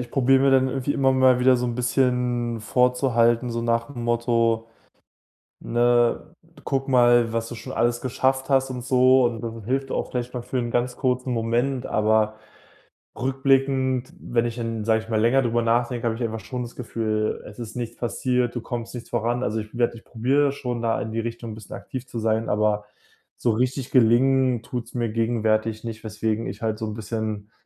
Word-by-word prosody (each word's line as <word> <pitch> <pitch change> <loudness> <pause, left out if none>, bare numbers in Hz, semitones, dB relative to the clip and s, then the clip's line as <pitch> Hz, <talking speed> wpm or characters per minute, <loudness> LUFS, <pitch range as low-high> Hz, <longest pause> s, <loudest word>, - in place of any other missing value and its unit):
ich 125 - -6
probiere 135 0 +4
mir 135 - +4
dann 130 0 +4
irgendwie 135 +2 -1
immer 135 -1 +2
mal 130 -1 +4
wieder 130 0 +5
so 125 - -1
'n 120 - -2
bisschen 125 -2 0
vorzuhalten, 125 0 +2
so 115 0 -2
nach 115 +3 -1
dem 120 -3 -6
Motto: 115 -1 +1 0.9
„Ne, 120 +6 +1 0.3
guck 135 -1 -1
mal, 120 -2 +4
was 115 0 -2
du - - -7
schon 115 -1 -8
alles 120 +1 +1
geschafft 130 +1 0
hast,“ 135 -1 +3
und 125 -1 -5
so 130 0 +5
und 115 -2 -1
das 115 -1 -4
hilft 135 +2 -1
auch - - -2
vielleicht 125 0 -4
mal 125 - -3
für 130 - -3
'n 120 -1 -2
ganz 125 +1 0
kurzen 125 0 0
Moment, 120 +3 0
aber 110 0 +2 0.9
rückblickend, 130 0 +1
wenn 120 -1 0
ich 120 -1 -3
dann, 115 -2 -3
sage 110 0 +2
ich 110 - -15
mal, 110 - +1
länger 120 +5 +4
darüber 120 -1 +1
nachdenke, 120 +1 0
habe 115 - 0
ich 120 - -4
einfach 110 -1 -3
schon 125 +5 -6
das 120 - -10
Gefühl: 110 -3 -2
„Es 105 +2 -11
ist 110 -2 -7
nichts 120 -1 -5
passiert, 125 0 -1
du 120 - -2
kommst 120 -1 -5
nicht 120 - -8
voran.“ 120 +2 -1
Also, 110 +2 -1
ich 110 +3 -8
werde 120 -1 +1
ich 110 - -16
probiere 135 +5 +1
schon 125 -4 -4
da 115 -1 0
in 110 - -4
die 115 - -2
Richtung 115 0 -5
'n - - -7
bisschen 110 -3 -9
aktiv 130 -1 -7
zu 115 - -5
sein, 110 0 0
aber 105 0 +1 0.5
so 120 - +1
richtig 125 +3 -1
gelingen, 130 0 +4
tut's 120 -1 -6
mir 120 -2 -1
gegenwärtig 110 -1 0
nicht, 115 -1 -7
weswegen 110 +1 -2
ich - - -7
halt 110 -1 -2
so 110 - -2
'n 105 - -4
bisschen, 110 -1 -4
120 Hz, 200 wpm, -24 LUFS, 115-125 Hz, 0.9 s, wieder